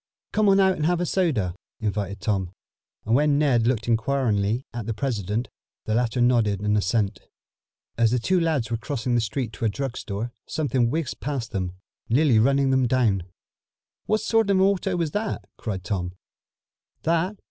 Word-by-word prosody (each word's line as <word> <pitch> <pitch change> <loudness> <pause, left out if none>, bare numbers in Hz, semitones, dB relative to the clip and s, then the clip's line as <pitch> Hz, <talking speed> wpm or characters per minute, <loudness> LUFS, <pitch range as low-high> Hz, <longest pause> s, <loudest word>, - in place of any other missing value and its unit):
"Come 210 -1 +3
on 195 0 +5
out 190 -1 +4
and 155 - +1
have 175 0 +2
some 175 - -1
soda," 135 - 0 0.2
invited 100 -2 -2
Tom, 95 -3 0 0.6
and 110 - +1
when 145 +2 +4
Ned 125 -6 +3
looked 120 -3 0
inquiringly 115 -1 +1
at 115 -3 -5
the 115 - -2
president, 110 -1 -2 0.4
the 110 - -1
latter 120 +1 +1
nodded 115 -5 +3
an 105 0 +1
assent. 100 -1 0 0.8
As 115 -1 +5
the 125 - +1
two 130 +11 +2
lads 155 -9 0
were 115 - +1
crossing 125 0 -2
the 120 - +3
street 115 +1 -3
to 115 - -3
a - - +3
drug 135 +3 -3
store, 110 +3 -4 0.2
something 130 -6 +1
whizzed 155 0 -2
past 135 -5 -3
them, 95 -4 -2 0.4
nearly 130 -1 +4
running 135 +3 +3
them 130 -1 +3
down. 110 -8 +2 0.8
"What 215 -1 +2
sort 225 -1 +2
of 195 - +4
an 190 - +4
auto 195 -1 +1
was 165 -3 -1
that?" 210 +4 -3
cried 95 -5 -4
Tom. 90 -3 -3 0.9
"That? 170 +5 +1
120 Hz, 180 wpm, -25 LUFS, 105-150 Hz, 0.9 s, on